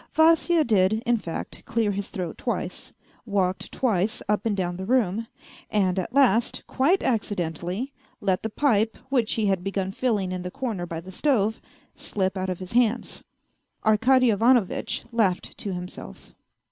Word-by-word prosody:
Vasya 325 +1 +5
did, 205 -5 +3
in 240 0 +3
fact, 170 -5 -5
clear 225 -2 +1
his 200 0 -3
throat 180 -3 -5
twice, - - -3 0.3
walked 190 -4 -1
twice 220 -5 0
up 210 +1 +1
and 205 -2 0
down 175 -2 -1
the 190 - -5
room, 230 -3 +1 0.4
and 190 -3 +1
at 185 - -4
last, 245 -4 +3
quite 320 +9 +2
accidentally, 200 - -2 0.3
let 190 -2 0
the 220 - -3
pipe, 225 -3 +1
wlu'ch 245 -5 +2
he 220 - 0
had 190 -3 +1
begun 195 -1 -2
filling 205 -5 0
in 185 0 -3
the 180 - -4
corner 215 -6 -4
by 165 -1 -4
the 185 +2 -10
stove, 220 -2 +1 0.3
slip 190 -1 -2
out 190 0 -2
of 180 - -2
his 185 0 -8
hands. 240 0 +1 0.6
Arkady 245 +3 +4
Ivanovitch 230 0 +2
laughed 210 -6 0
to 200 - -1
himself. 180 - -8
210 Hz, 160 wpm, -25 LUFS, 185-240 Hz, 0.6 s, Vasya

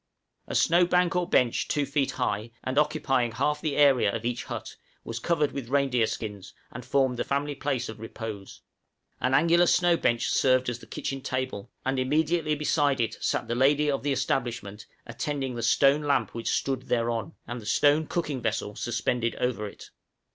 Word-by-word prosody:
A - - -4
snow 175 +2 +4
bank 180 +1 +2
or 180 0 0
bench 120 -2 +2
two 145 -1 0
feet 140 -1 0
high, 105 -2 -2
and 130 +2 +1
occupying 135 -6 +1
half 150 +5 0
the 155 -4 -1
area 135 -8 +5
of 115 +2 -5
each 120 0 -2
hut, - - -6 0.3
was 115 0 -5
covered 150 +2 +1
with 130 -4 -6
reindeer 135 -4 +2
skins, 105 -4 -6 0.2
and 120 - -8
formed 130 0 +1
the - - 0
family 145 +1 -1
place 135 -3 -2
of 110 0 -8
repose. 110 -3 -7 0.6
An 130 +1 +1
angular 170 +1 +4
snow 175 0 +4
bench 120 -5 +1
served 130 -1 +3
as 120 -1 -4
the - - -14
kitchen 135 0 -4
table, 130 -6 -3 0.2
and 130 0 0
immediately 155 +3 +1
beside 145 -2 +1
it 115 -2 -2
sat - - 0
the - - -1
lady 145 +4 +3
of 140 - -2
the 145 - -1
establishment 120 -6 -2 0.2
attending 140 -3 -3
the 120 - -4
stone 135 +5 +4
lamp 140 -7 0
which 115 0 -3
stood 135 -2 -1
thereon, 115 +4 -1
and 120 0 -6
the 105 - -10
stone 145 +5 +3
cooking 150 -7 -2
vessel 105 -2 -2
suspended 120 0 -1
over 115 -4 -2
it. - - -12
130 Hz, 185 wpm, -27 LUFS, 120-145 Hz, 0.6 s, area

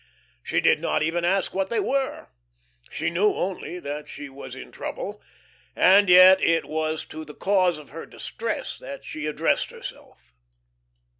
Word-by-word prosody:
She - - 0
did - - +3
not - - 0
even 170 +2 -1
ask 190 +2 +1
what 190 0 -1
they 235 - 0
were. 270 0 -2 0.6
She 160 +2 -2
knew 200 +5 +2
only 180 -1 -4
that 150 -2 -6
she 145 -1 -8
was 135 +1 -10
in - - -10
trouble, - - -6 0.5
and 195 +1 +6
yet 185 +1 +8
it 165 0 +2
was 155 0 -2
to 155 - -8
the 150 -1 -12
cause 185 -4 +2
of 150 - -13
her 165 +3 -8
distress 230 0 -5
that 275 -1 -9
she 155 -1 -5
addressed 150 - 0
herself. - - -11
175 Hz, 160 wpm, -25 LUFS, 155-190 Hz, 0.6 s, yet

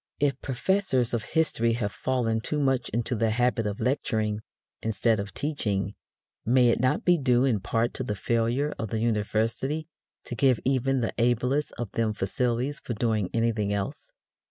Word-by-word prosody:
If 140 -1 +1
professors 130 - +1
of 115 -2 0
history 115 -8 +1
have 110 -3 -1
fallen 115 -3 0
too 150 +5 -2
much 135 -3 +1
into 120 +3 -1
the 115 -1 +1
habit 115 -1 +1
of 105 0 -4
lecturing, 110 -5 0 0.4
instead 110 0 +1
of 100 0 -4
teaching, 105 -10 -2 0.5
may 125 +1 +4
it - - +2
not 130 +1 +1
be 175 -2 +4
due 125 -1 +3
in 120 -6 +2
part 115 +5 0
to 130 - -4
the 105 -4 -2
failure 120 +7 0
of 110 - -3
the 110 - -1
university 115 +7 0 0.4
to - - -7
give 125 0 +3
even 135 0 +1
the 115 - -1
ablest 125 +5 +1
of 120 -4 -5
them 110 -2 0
facilities 125 +8 -1
for 120 - -5
doing 110 -4 0
anything 115 -3 0
else? 100 -1 -3
120 Hz, 170 wpm, -27 LUFS, 110-130 Hz, 0.5 s, may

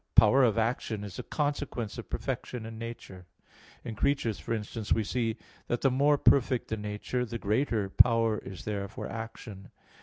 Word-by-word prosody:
Power 115 +5 +7
of 115 -3 +3
action 110 -2 -1
is 100 -4 -7
a - - -1
consequence 145 -7 -2
of 115 - -8
perfection 125 -3 -3
in 110 0 -8
nature. 105 -6 -8 0.6
In 115 - -5
creatures, 115 - 0
for 75 - -7
instance, 110 -1 -3
we 110 - +3
see 115 +1 -1 0.3
that 120 - -1
the 135 - +4
more 145 +3 +4
perfect 130 -3 +3
the 110 - -1
nature, 105 +4 -2
the 115 -1 -4
greater 110 -1 0
power 115 +1 +4
is 95 -3 -9
there 100 -2 -2
for 105 - -6
action. 110 -3 -7
115 Hz, 175 wpm, -30 LUFS, 105-125 Hz, 0.6 s, Power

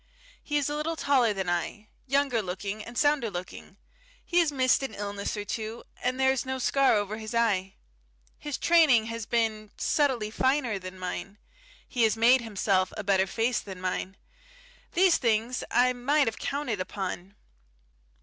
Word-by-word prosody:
He 295 - -1
is 285 - 0
a 295 - -2
little 315 +2 -2
taller 270 -6 +3
than 190 -2 -3
I, 175 +5 -2 0.2
younger 275 -3 +1
looking 195 +3 -5
and 235 +2 -9
sounder 290 -6 +2
looking; 185 +1 -8 0.5
he 350 - +2
has 330 -3 +3
missed 260 -2 +3
an 265 -6 -4
illness 200 +1 -4
or 205 - -4
so, 220 +2 -4 0.2
and 255 +1 -1
there 265 0 +4
is 265 - -1
no 260 0 -3
scar 270 0 +3
over 205 +1 -1
his 220 +1 -6
eye. 195 -5 +1 0.6
His 295 -2 -4
training 310 -10 +5
has 230 -2 -5
been 220 -2 0
subtly 255 -8 +1
finer 260 -4 +1
than 185 0 -9
mine; 185 +2 -5 0.5
he 245 - -2
has 225 -1 +3
made 240 +3 +5
himself 195 -4 0
a 215 - -4
better 195 -1 +2
face 230 +4 0
than 190 -2 -9
mine.... 185 +1 -3 0.8
These 365 -1 +4
things 230 +1 0
I 250 +2 +3
might 280 +4 +2
have 225 - -3
counted 275 -8 -2
upon. 190 0 -5
230 Hz, 170 wpm, -28 LUFS, 200-265 Hz, 0.8 s, training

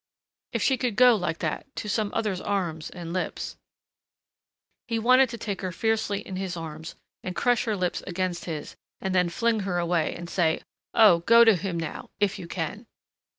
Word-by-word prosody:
If - - -1
she 265 - +3
could 245 -4 -1
go 250 0 +7
like 180 -5 -2
that, 160 - -3
to - - -4
some 210 0 0
other's 200 -5 -1
arms 175 -6 -2
and 170 -1 -7
lips... 185 - -3 1.3
He 230 - -1
wanted 255 +3 +5
to 235 - -6
take 205 -3 -4
her 185 -1 -3
fiercely 210 +1 0
in 190 -2 -7
his 190 -2 -3
arms 160 0 -7 0.3
and 180 - -4
crush 245 -2 +2
her 215 -3 0
lips 180 -1 -1
against 180 -1 -2
his 155 -4 -5 0.2
and 190 -1 -2
then 180 -1 +3
fling 230 +5 +1
her 190 -3 -2
away 170 -2 0
and 175 0 -7
say, 170 -2 +1 0.3
"Oh, 205 -7 +7
go 230 +7 +7
to 225 -3 +6
him 180 -1 -3
now 165 - -5
if 205 -2 +1
you 170 - -7
can!" 190 +7 -4
190 Hz, 190 wpm, -26 LUFS, 170-220 Hz, 1.3 s, go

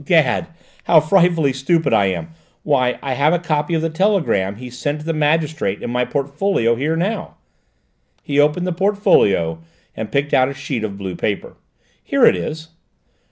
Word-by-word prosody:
"'Gad, 155 -1 +2 0.4
how 165 - +6
frightfully 165 -3 +2
stupid 140 +1 0
I 100 -3 +4
am! 95 - -3 0.3
Why, 130 -4 +1
I 135 - -2
have 145 +5 +2
a - - +3
copy 160 -1 -1
of 160 - -1
the 165 - 0
telegram 160 - +1
he 125 +3 -9
sent 145 +5 -4
the 165 - -1
magistrate 155 -8 0
in - - -4
my 125 0 0
portfolio 140 - 0
here 145 +7 -1
now." 190 +7 -3 0.9
He 145 -3 -1
opened 150 +5 +2
the 180 - -1
portfolio 165 - +2 0.4
and 110 - -6
picked 140 +1 -1
out 130 +1 +4
a 140 - -7
sheet 125 -6 -4
of 100 -2 -4
blue 95 -2 -5
paper. 100 +3 -3 0.5
"Here - - +3
it - - +5
is." 155 - -5
145 Hz, 170 wpm, -19 LUFS, 125-165 Hz, 0.9 s, how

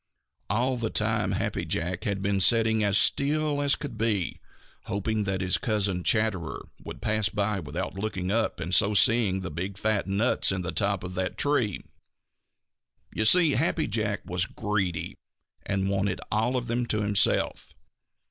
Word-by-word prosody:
All 125 +5 0
the 115 -2 -2
time 105 -3 0
Happy - - -2
Jack 85 +2 -3
had 100 -2 -2
been 100 -1 +1
sitting 110 +1 +4
as 100 0 +2
still 145 +4 +2
as 140 -1 +3
still - - -1
could 115 - -12
be, 105 -6 -1 0.5
hoping 105 +1 -2
that 95 -1 -1
his 90 0 +1
cousin 100 -6 -1
Chatterer 105 -8 0 0.2
would - - -9
pass 110 -1 +1
by 100 -1 -1
without 90 +4 -5
looking 95 -3 -3
up 115 +1 0
and 90 +3 -3
so 105 +2 +4
seeing 100 -3 +3
the 95 - -5
big 95 +5 -5
fat 105 -1 0
nuts 100 +5 +2
in 95 -1 -2
the 85 - -3
top 100 -3 0
of 90 0 -6
that 95 0 -3
tree. 130 -9 0 1.3
You 110 - -1
see 165 +5 +6
Happy 155 +3 +1
Jack 105 -1 -1
was 90 +1 0
greedy 95 -6 -2 0.5
and 95 -1 0
wanted 100 -1 -1
all 115 +5 +1
of 125 - -3
them 120 +1 -1
himself. 105 -2 +1
105 Hz, 165 wpm, -27 LUFS, 95-115 Hz, 1.3 s, see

